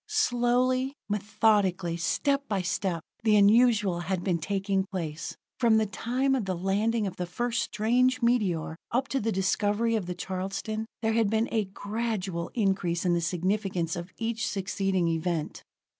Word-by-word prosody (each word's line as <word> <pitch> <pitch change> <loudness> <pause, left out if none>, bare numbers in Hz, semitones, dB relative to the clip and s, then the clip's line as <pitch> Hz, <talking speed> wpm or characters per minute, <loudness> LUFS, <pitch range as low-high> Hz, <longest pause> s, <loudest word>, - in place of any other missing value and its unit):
Slowly, 255 - +1
methodically, 205 -4 +1
step 275 - 0
by 195 -3 -1
step, 175 -2 -1 0.2
the 215 -2 +4
unusual 210 -3 +4
had 180 0 -2
been 175 -3 0
taking 195 +2 0
place. 165 -4 -5 0.2
From 230 -3 +4
the 220 - +3
time 250 +7 0
of 255 -6 0
the 185 -1 -1
landing 205 +5 0
of 190 -2 -5
the 180 - -3
first 240 +5 -1
strange 250 +4 +2
meteor, 200 -10 +1
up 260 +3 +1
to 270 - 0
the 225 -1 -1
discovery 205 +4 +1
of 200 -5 -2
the 180 - -3
Charleston, 195 +5 -4 0.2
there 220 0 +2
had 225 -2 +2
been 220 +2 +1
a 220 -3 +1
gradual 200 -3 -3
increase 190 -5 0
in 175 - +3
the 170 - +1
significance 180 0 -1
of 175 +1 -6
each 230 0 -2
succeeding 195 -2 0
event. 165 -1 -2
205 Hz, 160 wpm, -28 LUFS, 180-230 Hz, 0.2 s, the